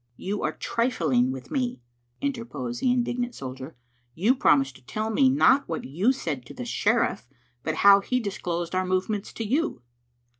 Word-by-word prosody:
"You 205 +2 -3
are - - -1
trifling 165 - +1
with 130 -1 -8
me," 250 - -1 0.4
interposed 190 - -4
the 250 - +3
indignant 245 0 -1
soldier. 130 +3 -7 0.2
" 120 0 -42
You 235 +5 +6
promised 135 - +3
to - - -22
tell 215 - -3
me 265 +4 +4
not 275 -2 +4
what 165 - -3
you 180 - +2
said 155 - -3
to - - -11
the 250 - -6
sheriff, 225 - +1 0.3
but - - -2
how 200 0 +9
he 250 +5 -1
disclosed 175 -6 -3
our 185 0 +1
movements 185 +3 -1
to 225 - -4
you. 265 - -1
200 Hz, 175 wpm, -26 LUFS, -, 0.4 s, how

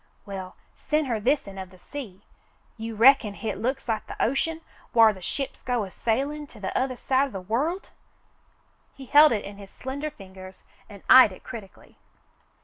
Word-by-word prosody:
"We'll 190 -2 -7 0.2
sen' 305 0 -1
her 235 -4 -1
this'n 210 -5 0
of 190 -1 -7
the 185 - -17
sea. 205 -3 -9 0.5
You 225 0 -6
reckon 230 -2 +5
hit 220 - -4
looks 260 +3 -2
like 220 -2 -2
the - - -9
ocean 320 +6 0 0.3
whar 225 -2 +7
the 190 - -13
ships 270 +9 -5
go 245 -3 -1
a 190 - -8
sailin' 280 +9 -2
to 225 - -15
t'othah 255 +6 -2
side 265 +2 +1
o' - - -12
the 195 - -4
world 280 - -1
V^ - - -22 1.1
He 270 - -10
held 295 +4 +7
it 215 -3 -1
in 200 0 -9
his 200 -1 -11
slender 280 +7 -5
fingers 190 -5 -13 0.3
and 200 -2 -12
eyed 255 -5 +9
it 185 - -13
critically. 205 -4 -11
230 Hz, 180 wpm, -26 LUFS, 200-275 Hz, 1.1 s, eyed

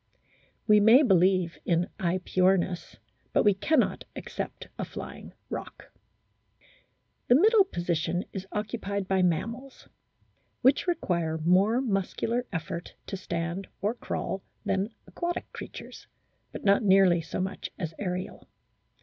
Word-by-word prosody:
We 210 -1 +6
may 225 +7 +7
believe 185 - +3
in 175 0 +1
/Epyornis, 185 0 +1 0.4
but - - +4
we 205 - +5
cannot 270 +8 +1
accept - - -6
a - - -1
flying - - -8 0.2
Roc. - - -7 1.4
The 245 - +6
middle 415 - +6
position 175 - -1
is 190 -1 -5
occupied 205 -2 -3
by 190 -1 +2
mammals, 230 +10 -2 0.7
which 265 +7 +4
require 170 - 0
more 190 +9 +3
muscular 230 +2 -1
effort 170 0 -5
to - - -5
stand 170 0 -3
or 210 +3 0
crawl 195 -5 -4 0.2
than 195 +2 0 0.2
aquatic 345 0 -4
creatures, - - -9 0.4
but - - -8
not 200 0 +5
nearly 190 -4 +5
so 160 - -5
much 190 +1 -3
as 165 -4 -4
aerial. 185 -2 -4
190 Hz, 120 wpm, -28 LUFS, 175-220 Hz, 1.4 s, may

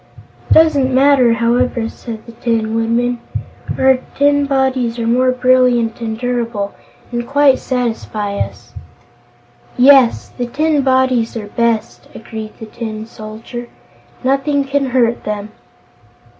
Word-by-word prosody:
"It - - +4
doesn't 290 -5 +4
matter, 260 -2 +4
however," 235 0 +1
said 225 -1 -9
the 235 - -11
Tin 225 -1 -1
Woodman; 235 +2 0 0.6
"our 265 -1 +4 0.2
tin 285 0 +2
bodies 265 -3 0
are 230 - -2
more 250 +3 +2
brilliant 250 -2 +2
and 220 -1 -3
durable, 235 -4 -2 0.4
and 240 0 -3
quite 280 -1 +4
satisfy 225 -5 -3
us." - - -6 1.0
"Yes, 260 -2 +5
the 245 -1 -3
tin 300 +3 +1
bodies 260 -3 +1
are 215 - -5
best," 230 0 -1
agreed 220 -1 -8
the 220 - -8
Tin 220 -1 -6
Soldier. 225 +2 -9 0.6
"Nothing 275 +2 +1
can 275 0 -1
hurt 240 -2 +1
them." 210 0 -4
245 Hz, 125 wpm, -16 LUFS, 225-265 Hz, 1.0 s, Yes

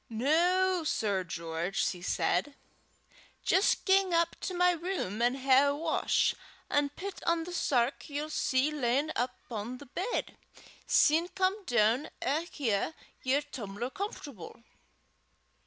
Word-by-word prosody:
"Noo, 345 +9 +2
Sir 205 -10 0
George," 170 +2 -2
she 180 - -2
said, 180 - 0 0.9
"jist 380 - +2
gang 385 -2 +4
up 335 0 +2
to 370 - -3
my 360 0 +4
room 335 - -3
an' 245 +2 +3
hae 270 +1 +4
a 285 0 +1
wash, 320 +2 +1 0.4
an' 290 0 +2
pit 375 +7 -7
on 335 -1 +2
the 355 +2 -7
sark 260 -3 0
ye'll 295 +2 -4
see 265 0 +1
lyin' 280 +1 0
upo' 245 -2 -4
the 285 - -12
bed; 365 - -3 0.5
syne 320 +3 +4
come 380 +2 -1
doon 240 +3 +2
an' 310 +6 -1
hae 245 +2 -1 0.3
yer 265 +3 +2
tum'ler 240 -4 -6
comfortable." 280 - -7
285 Hz, 130 wpm, -30 LUFS, 235-340 Hz, 0.9 s, gang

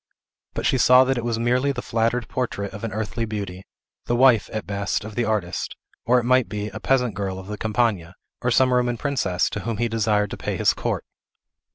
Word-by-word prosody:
But - - -2
she 130 - +2
saw 125 +2 +7
that 130 -1 0
it - - -5
was 120 -1 -1
merely 125 +4 +1
the 125 -3 -5
flattered 115 +1 0
portrait 100 -6 -3
of 105 - -8
an 115 - -3
earthly 110 +2 -3
beauty; 100 -4 -5 0.4
the 120 - +1
wife, 120 -3 +5
at 110 -2 -4
best, 100 0 -2
of 110 - -7
the 120 +2 0
artist; 100 -5 -2 0.3
or, 125 +2 +5
it 125 - +2
might 130 -4 +3
be, 105 +1 -3
a 95 - -8
peasant 125 -4 +1
girl 95 -1 -3
of 95 - -8
the 105 +2 -5
Campagna, 105 -6 0 0.3
or 125 - +1
some 130 +1 +4
Roman 125 -1 +1
princess, 110 -10 0
to 105 - -3
whom 110 +2 -3
he 120 +2 +1
desired 105 -2 +1
to - - -5
pay - - -3
his - - +3
court. - - -3
115 Hz, 220 wpm, -23 LUFS, 105-125 Hz, 0.4 s, saw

